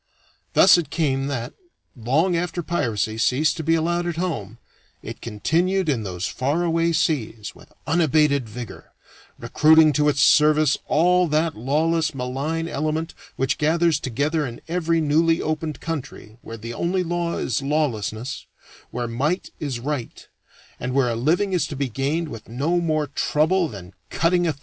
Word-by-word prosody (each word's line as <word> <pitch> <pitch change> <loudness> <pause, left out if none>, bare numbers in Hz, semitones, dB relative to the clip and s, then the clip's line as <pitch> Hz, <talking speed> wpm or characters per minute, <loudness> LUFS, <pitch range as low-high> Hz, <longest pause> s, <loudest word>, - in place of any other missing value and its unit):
Thus 185 -2 +7
it 160 -5 -4
came 135 -4 0
that, 125 -3 -4 0.4
long 145 +10 +1
after 175 0 -2
piracy 110 -9 -1
ceased 135 +7 +2
to 160 - -4
be 165 +2 +2
allowed 175 +2 0
at 170 - -2
home, 120 - -4 0.5
it - - -8
continued 170 - 0
in 135 -7 +1
those 90 -3 -4
far 145 +7 -1
away 165 0 +1
seas 140 -10 -1
with - - -18
unabated 150 -5 +2
vigor, 120 +1 -9 0.4
recruiting 155 0 +4
to 150 +1 +3
its 145 -1 -1
service 150 -1 +5
all 180 +3 +3
that 155 +1 0
lawless 155 +5 0
malign 140 +6 -3
element 155 +2 -2 0.2
which 135 +3 -1
gathers 165 0 +2
together 150 +5 -1
in 120 -4 -6
every 165 -1 0
newly 165 +2 +2
opened 155 -1 -3
country 130 -8 -6
where 115 - -8
the 115 +2 -7
only 180 +8 -1
law 170 0 -2
is 125 - -1
lawlessness, 135 -5 -2 0.4
where 120 0 -3
might 145 +10 -2
is 135 -5 -3
right 135 -1 -5 0.5
and 125 +1 -3
where 135 -3 +3
a 115 - -1
living 170 - +1
is 165 -5 +1
to 145 - -6
be 140 0 -1
gained 140 +7 -1
with 115 -7 -10
no 145 +9 0
more 155 -3 0
trouble 155 +5 +1
than 95 - -10 0.2
cutting 175 +1 +1
a 160 - +1
throat. 140 - -22
150 Hz, 160 wpm, -23 LUFS, 130-165 Hz, 0.5 s, Thus